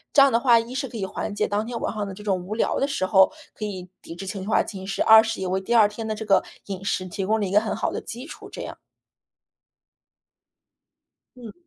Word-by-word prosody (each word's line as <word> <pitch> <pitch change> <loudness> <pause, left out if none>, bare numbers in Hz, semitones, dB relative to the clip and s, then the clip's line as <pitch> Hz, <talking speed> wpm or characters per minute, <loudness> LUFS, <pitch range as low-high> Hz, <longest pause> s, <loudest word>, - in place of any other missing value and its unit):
这 285 - +8
样 275 -1 +6
的 230 - +3
话， 235 -2 +5
一 235 +3 -6
是 270 0 -2
可 240 - -12
以 195 -4 -3
缓 195 - -4
解 205 - 0
当 205 +1 -1
天 235 0 -5
晚 - - -1
上 210 -1 -3
的 195 - -6
这 210 +2 -11
种 185 -3 -1
无 205 - -4
聊 225 - 0
的 275 - +1
时 275 -9 -2
候 190 +3 +5 0.2
可 215 - -4
以 185 -3 -6
抵 - - -10
制 190 +3 -8
情 190 0 -5
绪 - - -8
化 215 - +3
侵蚀； 195 -1 -5
二 220 0 +8
是 225 -3 -3
也 185 - -2
为 190 +1 0
第 215 +5 -2
2 220 -3 +6
天 220 +2 -6
的 220 - -1
这 215 +1 -6
个 200 -2 +3 0.2
饮 195 0 -6
食 185 -1 -1
提 190 +2 -4
供 220 +3 +1
了 205 - -1
一 - - -5
个 205 - +5
很 220 - -3
好 - - -1
的 - - -3
基 245 +5 -8
础 - - -10
这 - - -7
样。 - - -7 2.6
嗯。 235 -3 -10
210 Hz, 285 characters per minute, -24 LUFS, 190-230 Hz, 2.6 s, 这